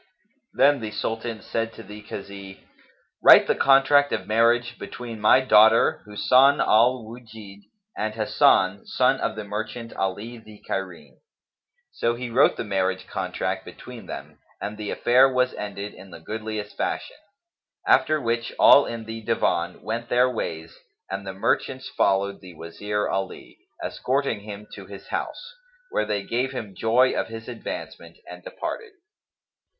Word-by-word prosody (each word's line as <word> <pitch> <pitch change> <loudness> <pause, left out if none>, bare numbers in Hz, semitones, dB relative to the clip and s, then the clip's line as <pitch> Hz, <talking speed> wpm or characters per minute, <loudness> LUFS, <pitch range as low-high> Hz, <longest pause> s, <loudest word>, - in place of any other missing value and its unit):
Then 140 +1 +4
the 110 -2 -5
Sultan 115 +1 -4
said 115 0 -3
to - - -11
the 105 +2 -11
Kazi, 100 -2 -10 0.6
"Write - - +9
the - - +2
contract 140 +1 +4
of - - -2
marriage 120 +2 +2
between 115 -3 -8
my 120 +5 +6
daughter 110 -2 +5
Husn 130 +7 +4
al 120 +2 +3
Wujdd 110 -3 -12 0.3
and 110 0 -3
Hasan, 100 -3 +3
son - - +2
of - - -1
the 110 - -5
merchant 110 +3 -6
Ali 105 +5 -4
the 110 -2 -15
Cairene." 95 -3 -5 0.7
So 120 0 -1
he 120 0 -6
wrote 130 +4 +4
the - - -3
marriage 95 -3 -1
contract 95 0 -3
between 125 -3 -11
them, 75 +2 -9 0.2
and 105 - -5
the 105 -1 -6
affair 130 +3 +4
was 125 0 +1
ended 100 0 -6
in 95 - -14
the - - -11
goodliest 110 +2 -6
fashion; - - -3 0.7
after 155 - +4
which 115 -2 -2
all 140 - +7
in 115 -1 -6
the 115 0 -7
Divan 90 -6 -1
went 115 +3 -4
their 125 +1 +3
ways 80 -7 -5 0.4
and 95 0 -5
the 95 - -4
merchants 130 +6 -1
followed 100 +1 0
the 90 -3 -12
Wazir 100 +6 -3
Ali, 95 -1 -5 0.2
escorting 135 -3 -1
him 105 0 -9
to - - -10
his - - -11
house, 485 - -5 0.4
where - - 0
they 100 -1 -2
gave 125 +5 -2
him 110 -6 -6
joy 120 +6 +3
of - - -2
his 115 0 -9
advancement 120 -2 -8
and - - -11
departed. - - -6
110 Hz, 150 wpm, -24 LUFS, 100-120 Hz, 0.7 s, Write